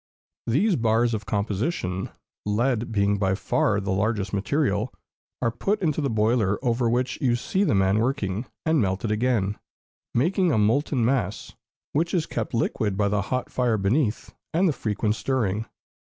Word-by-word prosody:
These 175 - +2
bars 115 0 +2
of 105 -2 -4
composition, 100 - -1 0.3
lead 115 +3 0
being 100 -1 +1
by 95 -1 +2
far 100 +2 +1
the 100 0 -2
largest 100 0 0
material, 105 +1 0 0.5
are 115 - +2
put 200 - -1
into 155 -4 0
the 140 - 0
boiler 110 -2 +2
over 120 0 +2
which 125 +2 -1
you 125 -3 +3
see 190 +11 0
the 150 - +2
man 95 +2 +3
working, 115 -3 -1 0.2
and 160 -2 +3
melted 95 +2 -1
again, 105 -3 0 0.6
making 175 +7 +2
a 130 - +2
molten 120 +4 +2
mass, 115 -6 -1 0.4
which 165 +5 +1
is 165 -3 +1
kept 115 -5 -3
liquid 105 -3 0
by 100 -1 +2
the 105 0 +1
hot 130 +5 -3
fire 120 -3 +1
beneath 110 +4 0 0.2
and 185 +3 +4
the 160 - +2
frequent 105 -3 -1
stirring. 110 -4 -1
115 Hz, 160 wpm, -25 LUFS, 100-130 Hz, 0.6 s, and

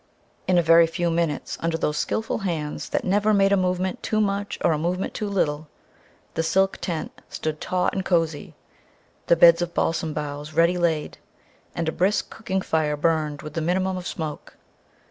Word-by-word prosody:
In 185 -1 +3
a 175 - +4
very 165 +1 +6
few 170 +1 -1
minutes, 165 -3 -1
under 165 0 0
those 150 -2 -1
skilful 220 +8 -1
hands 160 -7 -3
that - - -1
never 205 +3 +3
made 195 0 +4
a - - +6
movement 185 0 -1
too 215 - 0
much 200 -1 -1
or 170 - +5
a 155 - +1
movement 180 +4 -2
too 210 -2 -3
little, 155 -6 -1 0.7
the 165 - 0
silk 190 +4 +2
tent 165 -3 -3 0.2
stood 155 -1 -4
taut 180 0 0
and 190 - -2
cozy, 165 -5 -1 0.7
the 170 - +6
beds 170 0 +7
of 175 0 -3
balsam 165 -1 0
boughs 150 0 -5
ready 170 +2 +3
laid, 160 -3 -1 0.6
and 165 -1 -2
a - - +1
brisk 190 +5 0
cooking 190 -4 -3
fire 150 -2 0
burned 150 -2 0
with 150 - -8
the 165 - -2
minimum 185 +3 0
of 180 0 -5
smoke. 155 -3 -6
170 Hz, 185 wpm, -24 LUFS, 155-185 Hz, 0.7 s, beds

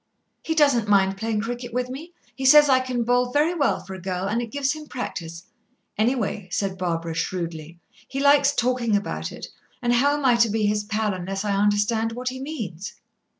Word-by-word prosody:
"He 320 - -2
doesn't 280 -8 +3
mind 195 -1 +3
playing 220 +1 -2
cricket 240 +1 -5
with 250 0 0
me; 315 +7 -8 0.2
he 270 - -7
says 295 +2 +7
I 260 -1 +5
can 255 -2 -2
bowl 245 +1 +1
very 300 +5 +2
well 295 -5 +1
for 190 - -9
a 190 - -8
girl, 185 +1 -3
and 225 +4 0
it 235 - -5
gives 275 +2 -1
him 305 0 -7
practice. 170 - -6 0.5
Anyway," 220 -3 -1
said 195 -1 -1
Barbara 170 -3 -2
shrewdly, 165 -1 -4 0.3
"he 270 - -4
likes 285 0 +5
talking 240 -3 +1
about 205 +1 -3
it, - - -8 0.3
and 240 -1 +1
how 285 +4 +3
am 290 - -4
I 245 -2 +5
to 235 -1 +4
be 215 0 0
his 210 0 +1
pal 210 0 -1
unless 195 +2 -4
I 205 - 0
understand 210 +3 +1
what 250 +2 -3
he 260 +1 -7
means?" 215 - -6
230 Hz, 200 wpm, -24 LUFS, 195-260 Hz, 0.5 s, says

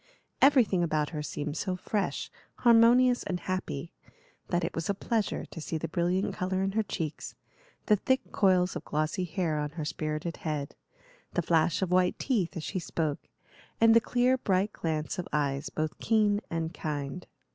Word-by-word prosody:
Everything 250 -10 +5
about 155 -3 0
her 155 -3 -3
seemed 150 0 -4
so 185 +3 -2
fresh, 200 +2 -2 0.2
harmonious, 245 +1 +5
and 180 -2 -3
happy, 185 -4 -4 0.5
that 175 -1 0
it 170 - -2
was 165 +2 -3
a 200 - +1
pleasure 220 +1 -1
to 165 - -9
see 160 - -3
the 165 - -3
brilliant 175 +3 0
color 185 +1 -1
in 195 - 0
her 220 +3 +1
cheeks, 165 -7 -5 0.5
the 210 - +4
thick 260 +6 0
coils 185 -2 +3
of - - -4
glossy 155 +5 -1
hair 165 -3 -1
on 150 0 -2
her 155 - -2
spirited 155 +1 -3
head, 150 -3 -3 0.6
the 175 - +1
flash 165 +2 +2
of 180 - -2
white 180 0 +3
teeth 195 -9 -1
as 160 - -4
she 185 - -3
spoke, 155 -4 -3 0.5
and 225 0 +6
the 230 - +6
clear, 250 +3 +2
bright 195 -1 +1
glance 155 +2 -2
of 180 - -3
eyes 140 -2 -1
both 155 0 -2
keen 210 -2 +2
and 165 0 -2
kind. 145 +1 -4
180 Hz, 175 wpm, -29 LUFS, 155-205 Hz, 0.6 s, and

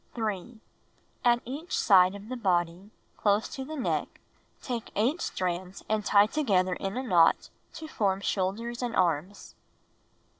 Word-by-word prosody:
3. 220 0 -4 0.6
At 240 0 +3
each 290 +8 -4
side 190 -2 +5
of 200 +1 -10
the 255 - -4
body, 180 -3 -1 0.3
close 205 +1 +2
to 270 - -6
the 310 +4 -7
neck, 265 - -2 0.4
take 240 -3 -5
8 260 - +1
strands 185 - -3
and 215 -1 0
tie 205 0 +5
together 200 -9 +1
in 195 +4 -4
a 260 - -2
knot 175 -9 +3 0.2
to 315 - -8
form 195 -9 0
shoulders 210 +5 -2
and 245 -2 -3
arms. 175 +2 -1
205 Hz, 145 wpm, -28 LUFS, 185-240 Hz, 0.6 s, side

